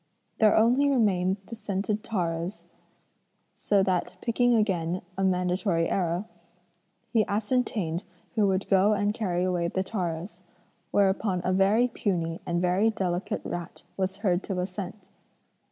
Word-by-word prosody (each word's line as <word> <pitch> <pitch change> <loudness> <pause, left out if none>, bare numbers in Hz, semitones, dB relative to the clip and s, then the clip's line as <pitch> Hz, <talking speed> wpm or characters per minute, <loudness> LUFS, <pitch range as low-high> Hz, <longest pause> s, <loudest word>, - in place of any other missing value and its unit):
There 215 -1 +5
only 245 +6 +4
remained 195 -7 +2
the 230 - -8
scented 205 0 -2
taros, 175 -3 -3 0.9
so 200 -2 +2
that 185 -2 0
picking 245 +1 +2
again 185 -5 0
a 195 - -1
mandatory 180 -2 +1
arrow, 175 +1 0 0.9
he 225 -2 +4
ascertained 205 -5 -1 0.3
who 215 -3 +3
would 190 0 0
go 195 +2 +4
and 205 0 +1
carry 180 -5 -1
away 180 -2 0
the 190 +2 -1
taros: 180 -2 -4 0.5
whereupon 195 -1 +2
a 185 - +2
very 200 +6 +4
puny 170 -8 -2
and 170 0 0
very 180 +5 +3
delicate 185 -4 -2
rat 175 -1 -6
was 190 0 -2
heard 180 -1 +3
to 190 -3 -2
assent. 185 +1 -6
190 Hz, 135 wpm, -27 LUFS, 180-215 Hz, 0.9 s, There